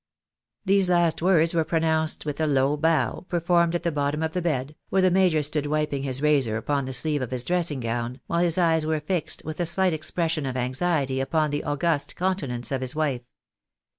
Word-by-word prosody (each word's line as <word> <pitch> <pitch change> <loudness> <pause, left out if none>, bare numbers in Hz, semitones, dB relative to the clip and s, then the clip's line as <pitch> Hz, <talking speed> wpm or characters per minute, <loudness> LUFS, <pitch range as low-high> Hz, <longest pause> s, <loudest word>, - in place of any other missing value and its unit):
These 195 -1 +3
last 175 -3 +2
words 170 -2 +3
were 165 -1 +2
pronounced 160 -1 0
with 150 0 -3
a 155 - +2
low 140 0 +2
bow, 150 -5 0
performed 170 0 +2
at 175 - -2
the 170 - 0
bottom 145 +1 -1
of 160 0 -2
the 180 - -1
bed, 150 -4 -2 0.2
where 190 -1 +2
the 185 - +4
major 180 -4 +3
stood 150 0 0
wiping 150 -2 -1
his 135 0 -2
razor 135 -8 +2
upon 140 +4 -1
the 130 - -5
sleeve 150 +2 0
of 125 - -3
his 125 -2 -2
dressing 170 -6 0
gown, 120 +2 -3
while 170 - -1
his 175 0 +1
eyes 165 -3 +3
were 155 0 0
fixed 165 +2 -2
with 155 +2 -6
a 175 - +1
slight 185 +1 +1
expression 160 -1 -2
of 130 -1 -3
anxiety 135 +1 0
upon 150 +2 0
the 145 - -2
august 145 0 -1
countenance 145 -11 -2
of 135 -1 -1
his 130 +2 -3
wife. 145 -6 -1
155 Hz, 205 wpm, -25 LUFS, 140-170 Hz, 0.2 s, the